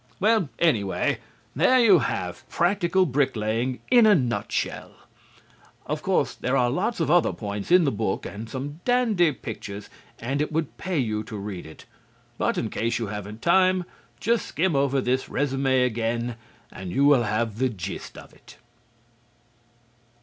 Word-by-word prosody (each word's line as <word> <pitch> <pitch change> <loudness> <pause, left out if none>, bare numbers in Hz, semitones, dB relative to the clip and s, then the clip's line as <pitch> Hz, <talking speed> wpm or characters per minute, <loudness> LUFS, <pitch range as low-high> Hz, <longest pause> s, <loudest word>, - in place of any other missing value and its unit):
Well, 210 -5 +2
anyway, 110 - +1 0.4
there 185 - +4
you 205 -8 +6
have 90 -9 -4
practical 185 +1 +2
bricklaying 125 -4 -1
in 240 -3 +7
a 210 - +7
nutshell. 125 -7 -2 0.9
Of - - -3
course - - +1
there 130 +2 -1
are 120 -1 +2
lots 195 - -1
of 160 -2 +1
other 175 0 +4
points 100 -2 -5
in 180 0 +6
the 140 - +2
book 100 -2 -2
and 110 +3 -7
some 140 +5 -6
dandy 225 -10 +3
pictures 105 -5 -8 0.3
and 135 +5 -2
it 150 - -2
would 155 -2 -2
pay 185 -3 -3
you 110 -5 0
to 110 - -7
read 100 -4 -6
it. 80 - -13 0.5
But - - 0
in - - -2
case 115 +1 -1
you 115 - -2
haven't 105 +1 -7
time, 185 +1 +4 0.4
just 230 0 0
skim 170 0 0
over 135 -1 +2
this 130 +1 0
résumé 135 -2 +1
again 115 0 -2 0.4
and 95 -2 -7
you 140 +8 +2
will 145 -3 +6
have 110 0 -1
the 130 0 +2
gist 95 -4 -7
of - - -13
it. - - -17
130 Hz, 155 wpm, -25 LUFS, 110-175 Hz, 0.9 s, in